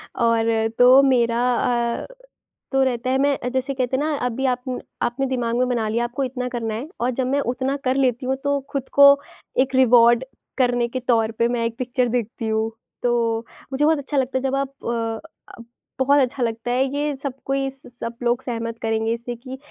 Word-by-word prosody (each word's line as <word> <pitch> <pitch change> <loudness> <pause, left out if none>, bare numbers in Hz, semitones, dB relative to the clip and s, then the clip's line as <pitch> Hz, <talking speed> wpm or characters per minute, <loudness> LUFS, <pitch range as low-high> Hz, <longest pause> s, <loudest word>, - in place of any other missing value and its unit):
और 230 -1 +2 0.3
तो 255 +2 +8
मेरा 235 -3 +3 0.6
अ, - - -7 0.7
तो 270 0 +3
रहता 255 -1 -1
है 265 - +2
मैं 280 0 +2
जैसे 260 +1 -1
कहते 260 0 -1
हैं 285 - -1
ना 310 -1 0
अभी 250 +2 -2
आप 250 - -6
न 250 - -3 0.2
आपने 265 +3 0
दिमाग 245 -3 -1
में 250 0 +2
बना 235 -3 0
लिया 235 +2 0
आपको 250 +3 -2
इतना 250 -1 -3
करना 230 -3 -3
है 235 +7 -5
और 245 - +1
जब 255 - +1
मैं 280 +2 +1
उतना 265 +2 -2
कर 255 +1 +2
लेती 255 -2 +1
हूँ 265 +1 +1
तो 285 0 +1
खुद 275 -2 -3
को 280 0 +9 0.5
एक 265 - -7
रिवार्ड 240 -1 +6 0.3
करने 245 -2 +2
के 255 +2 -4
तौर 225 -2 +3
पे 235 - +4
मैं 240 -1 -1
एक 230 +1 -3
पिक्चर 250 0 0
देखती 230 0 -4
हूँ। 220 0 0 0.3
तो 235 -2 +1 0.3
मुझे 275 +2 +1
बहुत 315 0 +4
अच्छा 285 +1 -4
लगता 260 0 +1
है 260 - -3
जब 270 0 0
आप 275 0 0 0.2
अ, 230 +5 -3 0.3
आप 235 - -12 0.3
बहुत 280 +2 +4
अच्छा 255 0 -1
लगता 230 +1 -2
है, 255 +2 +2
ये 290 0 -1
सब 275 -1 -4
कोई 270 0 0
स 270 0 -16
सब 230 0 -4
लोग 240 +1 +1
सहमत 230 -2 -4
करेंगे 225 0 0
इससे 235 +1 -5
कि 255 +2 -9
250 Hz, 210 wpm, -22 LUFS, 235-270 Hz, 0.7 s, को